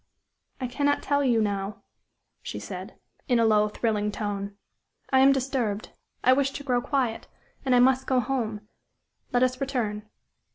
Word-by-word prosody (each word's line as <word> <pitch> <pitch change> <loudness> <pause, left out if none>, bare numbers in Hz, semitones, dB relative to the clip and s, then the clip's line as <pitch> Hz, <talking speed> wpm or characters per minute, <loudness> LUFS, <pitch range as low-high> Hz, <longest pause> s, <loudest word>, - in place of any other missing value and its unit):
"I 255 - -2
cannot 285 +3 0
tell 285 0 +1
you 235 -4 +3
now," 200 0 -3 0.6
she - - -6
said, - - -7 0.3
in 245 - +3
a 230 - +4
low, 210 -1 +4
thrilling 210 -1 -1
tone. 205 -1 -4 0.5
"I 265 - +5
am 270 +1 +7
disturbed; 255 -6 -1 0.3
I 255 - +6
wish 275 +1 +2
to 285 - -6
grow 250 -3 +1
quiet; 250 -4 -1 0.4
and 260 -2 +3
I - - +6
must 260 +1 +3
go 260 -1 +3
home. 220 -4 -2 0.6
Let 245 0 +3
us 255 +1 0
return." 220 -6 -2
245 Hz, 160 wpm, -26 LUFS, 210-265 Hz, 0.6 s, am